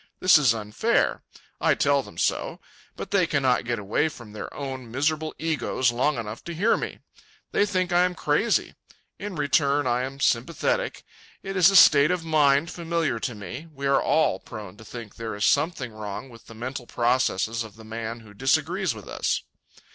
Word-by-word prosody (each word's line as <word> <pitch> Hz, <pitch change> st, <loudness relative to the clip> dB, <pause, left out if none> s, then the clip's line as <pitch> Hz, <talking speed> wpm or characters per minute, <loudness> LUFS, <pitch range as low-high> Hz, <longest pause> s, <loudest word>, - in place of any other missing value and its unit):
This 185 Hz, -4 st, +6 dB
is 125 Hz, -6 st, +3 dB
unfair. 110 Hz, -, 0 dB, 0.4 s
I -, -, +3 dB
tell -, -, +2 dB
them -, -, -13 dB
so. -, -, -1 dB, 0.4 s
But -, -, -7 dB
they 190 Hz, -4 st, +3 dB
cannot 135 Hz, -5 st, +1 dB
get 120 Hz, 0 st, -1 dB
away 105 Hz, +9 st, 0 dB
from 120 Hz, -7 st, -12 dB
their 105 Hz, -, -7 dB
own 130 Hz, -4 st, -6 dB
miserable 155 Hz, +5 st, -1 dB
egos 150 Hz, -5 st, 0 dB
long 130 Hz, +4 st, +1 dB
enough 110 Hz, -1 st, -6 dB
to 170 Hz, -, -5 dB
hear 205 Hz, +8 st, +3 dB
me. -, -, -4 dB, 0.5 s
They 205 Hz, -, +2 dB
think 185 Hz, -2 st, 0 dB
I 175 Hz, -, +5 dB
am 180 Hz, 0 st, 0 dB
crazy. 160 Hz, +10 st, +1 dB, 0.5 s
In 205 Hz, -2 st, -5 dB
return, 145 Hz, -1 st, +2 dB
I 120 Hz, 0 st, +1 dB
am 135 Hz, +2 st, -5 dB
sympathetic. 160 Hz, -, 0 dB, 0.4 s
It 195 Hz, 0 st, -5 dB
is 185 Hz, -1 st, +6 dB
a 195 Hz, -, 0 dB
state 150 Hz, -4 st, +8 dB
of 180 Hz, -2 st, -1 dB
mind 150 Hz, 0 st, +3 dB
familiar 165 Hz, -7 st, -1 dB
to 120 Hz, +1 st, -3 dB
me. 120 Hz, +9 st, -8 dB
We 140 Hz, -2 st, -7 dB
are 140 Hz, 0 st, +3 dB
all 155 Hz, -11 st, +2 dB
prone 105 Hz, -3 st, -9 dB
to 110 Hz, -, -12 dB
think 115 Hz, -2 st, -9 dB
there 115 Hz, -2 st, -5 dB
is 105 Hz, -, 0 dB
something 140 Hz, -6 st, +1 dB
wrong 110 Hz, +4 st, -6 dB
with 115 Hz, -2 st, -16 dB
the 115 Hz, -, -12 dB
mental 125 Hz, +2 st, -6 dB
processes 120 Hz, -2 st, +1 dB
of 110 Hz, -2 st, -12 dB
the 110 Hz, 0 st, -13 dB
man 115 Hz, +1 st, -5 dB
who 110 Hz, -2 st, -15 dB
disagrees 135 Hz, +5 st, 0 dB
with -, -, -11 dB
us. -, -, -1 dB
135 Hz, 185 wpm, -25 LUFS, 115-160 Hz, 0.5 s, state